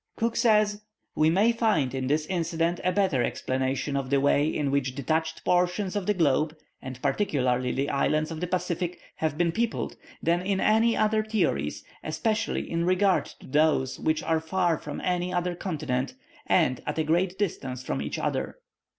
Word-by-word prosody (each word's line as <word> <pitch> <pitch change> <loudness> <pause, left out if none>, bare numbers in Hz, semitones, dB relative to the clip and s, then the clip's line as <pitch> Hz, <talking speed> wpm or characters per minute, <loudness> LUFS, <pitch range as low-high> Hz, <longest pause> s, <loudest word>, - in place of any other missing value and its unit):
Cook 230 0 -1
says, 210 -3 +3 0.3
"We 155 +1 +3
may 200 +8 +4
find 215 - +1
in 130 -1 -2
this 150 +2 +1
incident 170 -1 -1
a 185 - +2
better 180 -10 +2
explanation 130 +3 -1
of 135 -2 -2
the 140 0 +3
way 145 +1 +3
in 150 -3 -1
which 130 -2 0
detached 160 +4 -1
portions 180 +2 +1
of 200 -3 -2
the 210 - +2
globe, 155 -1 +2 0.2
and 130 -1 -7
particularly 130 -10 +1
the 140 +1 -1
islands 155 +3 +1
of 160 - -5
the 180 - -1
Pacific, 180 -1 -2 0.2
have 155 -2 -1
been 170 0 +2
peopled, 230 +5 -2 0.2
than 170 +2 +1
in 190 +1 0
any 225 +3 +3 0.3
theories; 160 - 0 0.2
especially 215 +8 -1
in 170 0 -1
regard 185 +2 +2
to - - -14
those 150 -2 +2
which 155 0 0
are 160 -1 +1
far 170 0 0
from 150 - -6
any 180 0 -1
other 180 0 0
continent, 150 - -3 0.3
and 155 - +2
at 150 - -2
a 160 - +2
great 175 +4 +1
distance 135 -10 -3
from 70 - -2
each 75 - -3
other." - - -2
165 Hz, 175 wpm, -27 LUFS, 140-185 Hz, 0.3 s, may